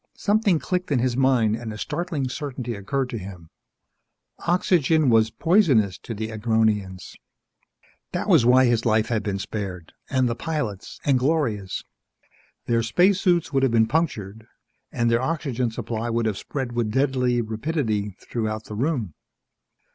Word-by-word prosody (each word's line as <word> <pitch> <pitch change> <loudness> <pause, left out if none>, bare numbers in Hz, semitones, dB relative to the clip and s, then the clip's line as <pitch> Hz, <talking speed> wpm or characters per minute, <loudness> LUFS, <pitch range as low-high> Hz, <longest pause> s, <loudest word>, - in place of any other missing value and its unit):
Something 205 -3 +2
clicked 180 +1 -3
in 140 - +3
his 125 0 0
mind 125 -5 +3
and 115 -1 -6
a 105 - -7
startling 160 - -3
certainty 130 -3 -5
occurred 125 +6 -2
to 115 - -4
him. 90 -4 -10 1.0
Oxygen 165 -5 +3
was 110 -1 +4
poisonous 135 - +2
to 115 - -7
the 110 +1 -4
Agronians! 110 -4 0 1.0
That - - -3
was - - +5
why 125 +2 +6
his 120 -2 +2
life 110 -2 +2
had 115 -3 0
been 100 -1 -2
spared. 95 -4 -6 0.2
And 130 -2 +2
the 120 - 0
pilot's 120 - -4
and 135 -3 +3
Gloria's. 125 - -1 0.8
Their 115 -1 +2
spacesuits 175 - +2
would 135 - +3
have 135 -2 +2
been 115 -1 +4
punctured 110 - -2 0.4
and 120 0 +1
their 115 +1 +2
oxygen 130 -4 -1
supply 115 0 -4
would 115 0 0
have 105 -3 -1
spread 130 -4 -4
with 120 -2 -1
deadly 125 0 +1
rapidity 110 - -2
throughout 110 -2 -3
the 105 - -8
room. 120 - -1
120 Hz, 150 wpm, -24 LUFS, 110-140 Hz, 1.0 s, why